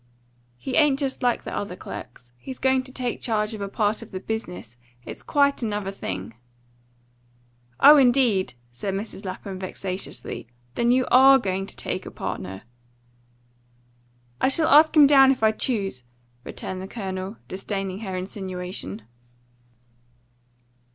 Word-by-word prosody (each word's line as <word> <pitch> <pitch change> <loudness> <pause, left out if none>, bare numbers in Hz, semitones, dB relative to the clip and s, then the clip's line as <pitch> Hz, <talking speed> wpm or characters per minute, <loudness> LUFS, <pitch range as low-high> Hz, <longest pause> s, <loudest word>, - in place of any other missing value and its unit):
"He 255 - -3
ain't 295 -3 +4
just 275 -2 -2
like 245 -2 +1
the - - -5
other 200 -3 -4
clerks. 120 -7 -10
He's 260 - -7
going 265 0 +2
to 260 - -9
take 250 -2 -3
charge 215 -1 0
of 215 - -6
a 200 - -2
part 210 +1 0
of - - -10
the 185 - -5
business. 120 - -5 0.3
It's - - -6
quite 280 -1 +2
another 210 -4 -2
thing." 95 - -6 1.5
"Oh, 295 +1 +9
indeed!" 245 - +3 0.2
said 195 +10 -3
Mrs. 205 0 -6
Lapham 190 0 -6
vexatiously. 185 - -5 0.3
"Then 235 - +1
you 255 +1 +3
ARE 270 +2 +8
going 195 -5 -2
to - - -10
take - - -4
a - - -5
partner." 95 +1 -6 1.8
"I - - +4
shall 315 +4 +2
ask 310 +2 +6
him 295 - +9
down 270 -1 +7
if 255 -4 -2
I 220 - +6
choose!" 200 - -2 0.4
returned 185 +6 -6
the 190 - -6
Colonel, 190 -1 -5
disdaining 195 0 -4
her 190 -4 -4
insinuation. 180 - -5
205 Hz, 145 wpm, -24 LUFS, 185-260 Hz, 1.8 s, Oh